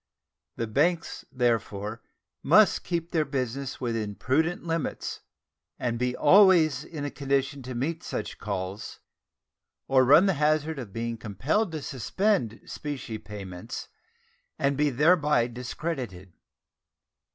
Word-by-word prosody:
The 115 Hz, -, -2 dB
banks, 160 Hz, +9 st, 0 dB
therefore, 115 Hz, -3 st, -1 dB, 0.4 s
must -, -, +5 dB
keep 170 Hz, -1 st, -3 dB
their 160 Hz, -2 st, +2 dB
business 135 Hz, -1 st, -3 dB
within 115 Hz, -4 st, -2 dB
prudent 160 Hz, -, 0 dB
limits, 165 Hz, -2 st, -3 dB, 0.6 s
and 120 Hz, -1 st, -2 dB
be 125 Hz, 0 st, 0 dB
always 185 Hz, -6 st, +6 dB
in 150 Hz, -3 st, -6 dB
a 145 Hz, -, -3 dB
condition 140 Hz, 0 st, -1 dB
to 130 Hz, 0 st, -7 dB
meet 155 Hz, +7 st, -2 dB
such -, -, -5 dB
calls, 100 Hz, 0 st, -5 dB, 0.9 s
or 130 Hz, -1 st, +5 dB
run 150 Hz, +8 st, +7 dB
the 195 Hz, -, +3 dB
hazard 155 Hz, 0 st, +1 dB
of 115 Hz, -6 st, -7 dB
being 115 Hz, +2 st, -3 dB
compelled 140 Hz, -, -1 dB
to 155 Hz, -3 st, -4 dB
suspend 135 Hz, -, 0 dB
specie 130 Hz, -7 st, -5 dB
payments 95 Hz, -5 st, -8 dB, 0.7 s
and 140 Hz, 0 st, +1 dB
be 150 Hz, +1 st, +2 dB
thereby 150 Hz, -2 st, +3 dB
discredited. 120 Hz, -, -5 dB
135 Hz, 120 wpm, -27 LUFS, 115-155 Hz, 0.9 s, run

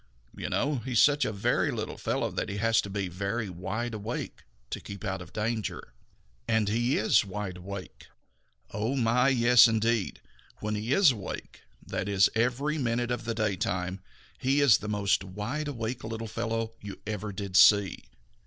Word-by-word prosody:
You -, -, -4 dB
know, 145 Hz, +1 st, 0 dB
he 125 Hz, +2 st, -5 dB
is 115 Hz, -, +4 dB
such 145 Hz, 0 st, +5 dB
a -, -, -1 dB
very 100 Hz, -2 st, +1 dB
little -, -, -4 dB
fellow -, -, -1 dB
that -, -, -3 dB
he 100 Hz, -, -4 dB
has 110 Hz, +2 st, +3 dB
to 100 Hz, -, -7 dB
be 100 Hz, -1 st, -2 dB
very 100 Hz, +5 st, -3 dB
wide 105 Hz, +7 st, -4 dB
awake 110 Hz, +3 st, -5 dB, 0.3 s
to -, -, -3 dB
keep 100 Hz, +2 st, -8 dB
out 95 Hz, -2 st, -2 dB
of 90 Hz, -, -11 dB
danger. 110 Hz, -, -3 dB, 0.5 s
And 110 Hz, -2 st, +2 dB
he 120 Hz, +5 st, +1 dB
is 110 Hz, -, +4 dB
wide 100 Hz, -2 st, -5 dB
awake. 95 Hz, +1 st, -8 dB, 0.6 s
Oh, 110 Hz, +6 st, -1 dB
my, 125 Hz, +1 st, +3 dB
yes, 120 Hz, -2 st, +7 dB
indeed! 115 Hz, -2 st, 0 dB, 0.4 s
When 105 Hz, 0 st, -3 dB
he 105 Hz, +3 st, -3 dB
is 170 Hz, 0 st, +6 dB
awake, 105 Hz, -6 st, -7 dB, 0.2 s
and -, -, -17 dB
that -, -, -2 dB
is 95 Hz, -2 st, +4 dB
every 125 Hz, +7 st, 0 dB
minute 120 Hz, -1 st, 0 dB
of 120 Hz, -1 st, -3 dB
the 115 Hz, -1 st, -2 dB
daytime, 95 Hz, -3 st, -1 dB, 0.4 s
he 135 Hz, +2 st, +2 dB
is 140 Hz, -7 st, +6 dB
the 105 Hz, -, -6 dB
most 100 Hz, -2 st, +1 dB
wide 105 Hz, +11 st, -4 dB
awake 120 Hz, -3 st, -4 dB
little 115 Hz, 0 st, -5 dB
fellow 115 Hz, 0 st, -3 dB
you 100 Hz, -1 st, -8 dB
ever 105 Hz, 0 st, -4 dB
did 100 Hz, -1 st, -6 dB
see. 100 Hz, +1 st, +5 dB
110 Hz, 180 wpm, -28 LUFS, 100-120 Hz, 0.6 s, yes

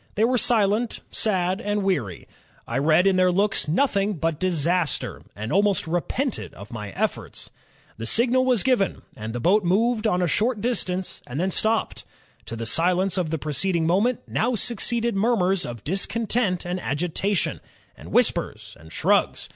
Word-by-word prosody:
They 215 Hz, -, +2 dB
were 250 Hz, +2 st, +3 dB
silent, 220 Hz, 0 st, +1 dB
sad, 190 Hz, -1 st, 0 dB
and 205 Hz, -2 st, -1 dB
weary. 140 Hz, -, -2 dB, 0.4 s
I 120 Hz, +3 st, -1 dB
read 155 Hz, +5 st, +3 dB
in 195 Hz, -1 st, +3 dB
their 185 Hz, 0 st, +4 dB
looks 195 Hz, 0 st, +1 dB
nothing 200 Hz, -, +1 dB
but 165 Hz, -3 st, -2 dB
disaster, 175 Hz, -1 st, 0 dB
and 110 Hz, +2 st, -4 dB
almost 200 Hz, 0 st, +2 dB
repented 175 Hz, -, -2 dB
of 100 Hz, +1 st, -11 dB
my 105 Hz, -4 st, -6 dB
efforts. -, -, -4 dB, 0.5 s
The 115 Hz, +1 st, -4 dB
signal 245 Hz, -, +3 dB
was 250 Hz, -5 st, +2 dB
given, 250 Hz, -7 st, +1 dB
and 110 Hz, +1 st, -6 dB
the 120 Hz, -, -4 dB
boat 195 Hz, -, +3 dB
moved 220 Hz, +5 st, +1 dB
on 180 Hz, -3 st, +1 dB
a -, -, +2 dB
short 220 Hz, +6 st, 0 dB
distance 190 Hz, -6 st, -2 dB
and 125 Hz, +4 st, -5 dB
then 190 Hz, +2 st, 0 dB
stopped.... 220 Hz, +4 st, 0 dB, 0.4 s
To 115 Hz, -, -5 dB
the 115 Hz, 0 st, -5 dB
silence 180 Hz, +9 st, +2 dB
of 170 Hz, -3 st, -1 dB
the 160 Hz, -, -1 dB
preceding 160 Hz, +3 st, -1 dB
moment, 205 Hz, +9 st, +1 dB
now 245 Hz, +2 st, 0 dB
succeeded 235 Hz, 0 st, -1 dB
murmurs 195 Hz, -4 st, +1 dB
of 120 Hz, -3 st, -8 dB
discontent 195 Hz, +1 st, -1 dB
and 180 Hz, +1 st, -3 dB
agitation, 175 Hz, +7 st, -1 dB, 0.3 s
and -, -, -12 dB
whispers, -, -, 0 dB
and 80 Hz, -, -15 dB
shrugs. -, -, +1 dB
190 Hz, 165 wpm, -24 LUFS, 165-220 Hz, 0.5 s, their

